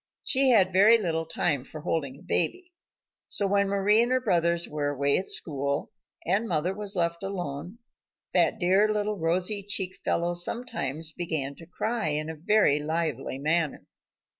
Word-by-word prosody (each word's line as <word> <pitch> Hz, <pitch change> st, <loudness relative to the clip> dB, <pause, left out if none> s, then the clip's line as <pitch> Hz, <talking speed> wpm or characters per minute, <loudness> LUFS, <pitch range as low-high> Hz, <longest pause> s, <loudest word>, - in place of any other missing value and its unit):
She 270 Hz, -1 st, +3 dB
had 190 Hz, -6 st, +4 dB
very 210 Hz, +5 st, +7 dB
little 165 Hz, -6 st, -2 dB
time 145 Hz, -6 st, -1 dB
for 155 Hz, +3 st, -10 dB
holding 145 Hz, -5 st, -2 dB
a -, -, -17 dB
baby. 360 Hz, -, -1 dB, 0.5 s
So 200 Hz, -, 0 dB
when 200 Hz, 0 st, +2 dB
Mari 200 Hz, +2 st, +3 dB
and 240 Hz, +1 st, 0 dB
her 255 Hz, -, +3 dB
brothers 170 Hz, -7 st, +1 dB
were 150 Hz, -1 st, -2 dB
away 140 Hz, 0 st, +2 dB
at 190 Hz, -, -5 dB
school, 140 Hz, -2 st, -1 dB, 0.3 s
and 200 Hz, +7 st, +1 dB
mother 175 Hz, +1 st, 0 dB
was 205 Hz, 0 st, -1 dB
left 170 Hz, -1 st, 0 dB
alone, 180 Hz, -1 st, -5 dB, 0.6 s
that -, -, +3 dB
dear 195 Hz, +4 st, +3 dB
little 210 Hz, -1 st, -1 dB
rosy 180 Hz, +5 st, 0 dB
cheeked 190 Hz, -2 st, -2 dB
fellow 175 Hz, +1 st, 0 dB
sometimes 175 Hz, -, -2 dB
began 155 Hz, -5 st, -3 dB
to 165 Hz, +3 st, -14 dB
cry 220 Hz, +1 st, -2 dB
in 155 Hz, +1 st, -2 dB
a -, -, -8 dB
very 165 Hz, -2 st, +3 dB
lively 150 Hz, -4 st, -2 dB
manner. 155 Hz, +2 st, -1 dB
175 Hz, 165 wpm, -27 LUFS, 155-205 Hz, 0.6 s, very